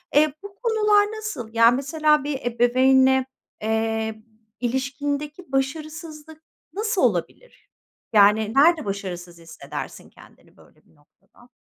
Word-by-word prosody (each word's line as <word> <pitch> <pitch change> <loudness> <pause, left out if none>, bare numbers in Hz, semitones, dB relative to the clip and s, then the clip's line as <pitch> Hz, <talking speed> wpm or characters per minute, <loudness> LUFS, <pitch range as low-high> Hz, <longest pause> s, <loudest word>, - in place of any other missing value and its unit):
Eee, 300 -1 +4
bu 400 -1 -10
konular 425 -3 +3
nasıl? 425 - -6
Yani, 230 +1 +5
mesela 300 +2 +1
bir 290 -2 -3
ebeveynle, 260 +2 +3 0.4
eee, 220 0 -2 0.4
ilişkindeki 285 +5 -3
başarısızlık 310 +3 -5 0.3
nasıl 425 +3 -1
olabilir? - - -2 0.4
Yani, 210 +1 +4
nerede 310 -1 +4
başarısız 180 -3 -6
hissedersin 165 -1 -9
kendini - - -20
böyle - - -23
bir - - -28
noktada? 150 +10 -26
265 Hz, 110 wpm, -23 LUFS, 220-310 Hz, 0.4 s, Yani